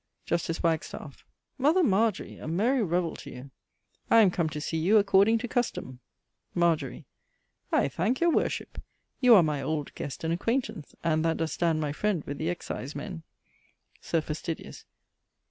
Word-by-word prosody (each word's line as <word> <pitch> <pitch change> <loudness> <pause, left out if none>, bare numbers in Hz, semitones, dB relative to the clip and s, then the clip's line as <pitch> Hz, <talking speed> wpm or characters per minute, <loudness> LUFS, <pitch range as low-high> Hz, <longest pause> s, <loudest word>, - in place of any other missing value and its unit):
Justice 165 0 -1
Wagstaffe. 160 -3 -2 0.4
Mother 315 +7 +4
Margery, 215 - +1
a - - -7
merry 225 +11 +2
revell 175 -3 0
to - - -10
you! 130 +2 -10 0.6
I 230 - +7
am 195 -4 +5
come 170 -3 0
to 155 -1 -5
see 160 +2 -3
you 185 +7 +4
according 205 +2 +5
to 245 +2 -4
custome. 220 - -2 0.6
Margery. 165 -7 0 0.7
I - - +3
thanke 190 - -1
your 340 0 +3
worship. - - -1 0.4
You 250 -3 +7
are 185 - +7
my 150 -3 -1
old 150 -1 -3
guest 140 - -6
and 165 0 0
acquaintance, 230 - -2
and 160 -1 +1
that 165 0 +1
does 165 -1 -2
stand 165 -2 +1
my 150 -2 -1
friend 185 0 -1
with 140 - -6
the 160 - -1
excisemen. 170 +1 -5 0.8
_Sir 165 -2 0
Fastidious. 155 +1 -6
170 Hz, 160 wpm, -28 LUFS, 155-210 Hz, 0.8 s, I